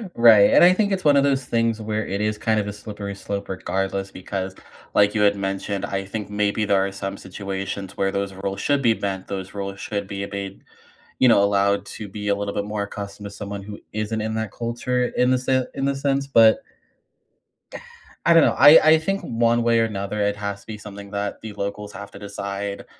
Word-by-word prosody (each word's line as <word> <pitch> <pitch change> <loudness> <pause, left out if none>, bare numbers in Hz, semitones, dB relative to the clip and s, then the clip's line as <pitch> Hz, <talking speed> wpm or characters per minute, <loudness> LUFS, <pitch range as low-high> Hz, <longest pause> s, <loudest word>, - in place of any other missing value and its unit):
Right, 115 -4 +7
and - - +6
I 180 +1 +8
think 205 +1 +1
it's 190 -1 -1
one 145 -2 +5
of 140 - +4
those 135 -2 +1
things 115 -2 0
where 110 0 -2
it 100 +1 -3
is, 105 0 0
kind 110 0 +1
of, 105 - -2
a 100 - -4
slippery 105 -1 -7
slope 100 0 -5
regardless 95 +1 -2
because, 95 0 -5 0.4
like, 105 +1 +4
you 105 - +2
had 100 0 +4
mentioned, 95 0 -3
I 95 0 -3
think 105 +1 -5
maybe 105 +1 0
there 100 -1 +2
are 100 - -3
some 95 0 -5
situations 95 0 -6
where 95 0 +1
those 100 0 -2
rules 95 +1 -4
should 145 -1 +1
be 115 -3 +4
bent, 95 -3 -4
those 95 -1 -5
rules 100 -1 -5
should 100 -2 -4
be 100 0 -4
a - - -4
b 100 -1 -6 0.6
you 130 - +5
know, 100 -4 +6
allowed 100 0 +2
to 105 +1 -8
be 105 +1 -5
a 100 - +3
little 100 0 -4
bit 100 - -1
more 105 0 -3
accustomed 100 0 -7
to 100 - -6
someone 100 -1 -7
who 105 +1 -8
isn't 110 +1 -2
in 110 +1 -2
that 110 -2 -2
culture 120 +3 -1
in 125 +1 +3
the 130 - +3
sen 130 0 +1
in 135 - -2
the 140 0 +1
sense, 140 0 0
but 115 - +5 1.6
I 170 - +6
don't 165 -2 +7
know. - - +3
I 145 +3 +9
I 160 0 +8
think 195 +5 -2
one 115 0 +1
way 115 0 +3
or 115 - +3
another 105 0 -3
it 100 0 +1
has 100 0 -5
to - - -23
be 110 - -6
something 100 -1 -10
that 100 0 -3
the 110 -1 -7
locals 105 0 -5
have 100 0 -9
to - - -11
decide 100 0 -5
100 Hz, 225 wpm, -23 LUFS, 100-115 Hz, 1.6 s, I